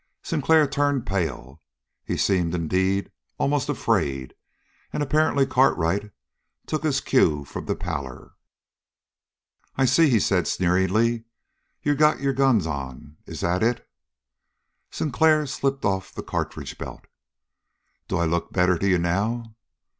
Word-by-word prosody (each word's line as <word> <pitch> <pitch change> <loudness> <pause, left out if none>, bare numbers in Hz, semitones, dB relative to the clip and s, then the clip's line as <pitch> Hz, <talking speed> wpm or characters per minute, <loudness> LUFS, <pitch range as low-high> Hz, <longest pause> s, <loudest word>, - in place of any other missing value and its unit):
Sinclair 160 -2 +3
turned 145 -2 0
pale. 75 -9 -3 0.4
He - - -3
seemed, 90 -3 +1
indeed, 95 +4 0 0.3
almost 140 -1 0
afraid, 65 -2 -1 0.6
and 150 - -1
apparently 145 -1 +2
Cartwright 105 -7 +1 0.6
took 155 - -2
his 145 -3 0
cue 75 - +2
from - - -7
the - - 0
pallor. 70 -7 -6 1.4
"I 135 - +2
see," 160 +5 +4
he 115 -4 +4
said 90 -3 +1
sneeringly. 95 +6 +1 0.6
"You 145 - +2
got 150 +1 +3
your 140 0 0
guns 130 -8 +3
on. 70 0 -6
Is - - -7
that 90 +2 0
it?" 115 +1 0 1.0
Sinclair 155 +2 +2
slipped 135 0 -2
off 95 -2 -1
the - - -5
cartridge - - -4
belt. - - -8 1.0
"Do 95 - -1
I 85 - +1
look 85 +1 -1
better 90 -2 +2
to 100 - 0
you 90 - +4
now?" 110 +7 -1
100 Hz, 130 wpm, -24 LUFS, 85-135 Hz, 1.4 s, see